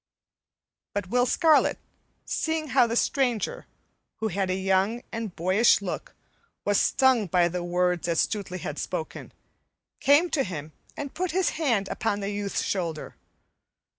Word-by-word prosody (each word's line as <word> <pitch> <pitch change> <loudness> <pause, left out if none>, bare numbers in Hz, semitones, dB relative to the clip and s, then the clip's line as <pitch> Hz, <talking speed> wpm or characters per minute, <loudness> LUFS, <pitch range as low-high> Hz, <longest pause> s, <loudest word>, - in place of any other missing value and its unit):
But 200 -3 -2
Will 245 +1 +3
Scarlet, 315 +4 +4 0.5
seeing 320 -2 -2
how 250 -2 +4
the 230 - -2
stranger, 265 - 0 0.5
who 220 - -2
had 190 0 -1
a 185 - +1
young 190 +5 +1
and 225 -5 -5
boyish 185 +7 +4
look, 195 -3 -6 0.5
was 205 -1 +3
stung 260 -6 +3
by 175 0 +3
the 175 +1 -3
words 180 0 0
that 170 -1 0
Stutely 195 -1 -1
had - - -5
spoken, - - -5 0.7
came 295 +5 +4
to 275 - +2
him 160 - -6 0.3
and 280 -2 -5
put 365 +2 -2
his 375 - +3
hand 240 -11 0
upon 205 -2 -1
the 200 0 -3
youth's 205 -1 -2
shoulder. 170 -5 -3
205 Hz, 145 wpm, -26 LUFS, 185-260 Hz, 0.7 s, Scarlet